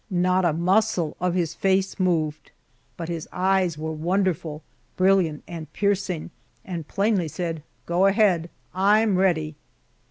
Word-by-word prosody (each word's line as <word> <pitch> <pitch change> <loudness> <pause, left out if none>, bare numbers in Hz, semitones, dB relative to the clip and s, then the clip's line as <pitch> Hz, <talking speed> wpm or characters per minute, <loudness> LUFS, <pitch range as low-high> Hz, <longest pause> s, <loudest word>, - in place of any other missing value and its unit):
Not 185 0 +2
a 170 - +3
muscle 180 0 +1
of 180 0 0
his 170 -4 -1
race 195 0 +1
moved, 160 -5 0 0.5
but 165 - -5
his 165 -2 -5
eyes 185 -3 +1
were 160 +1 -4
wonderful, 165 -2 -1 0.3
brilliant, 185 -5 +2
and 165 -2 -8
piercing, 195 -5 -1 0.3
and 170 -5 -5
plainly 200 -3 +1
said, 165 0 -4 0.2
"Go 180 +3 +3
ahead, 195 -5 +2 0.2
I'm 205 +2 +3
ready!" 160 -5 +1
180 Hz, 130 wpm, -24 LUFS, 165-195 Hz, 0.5 s, a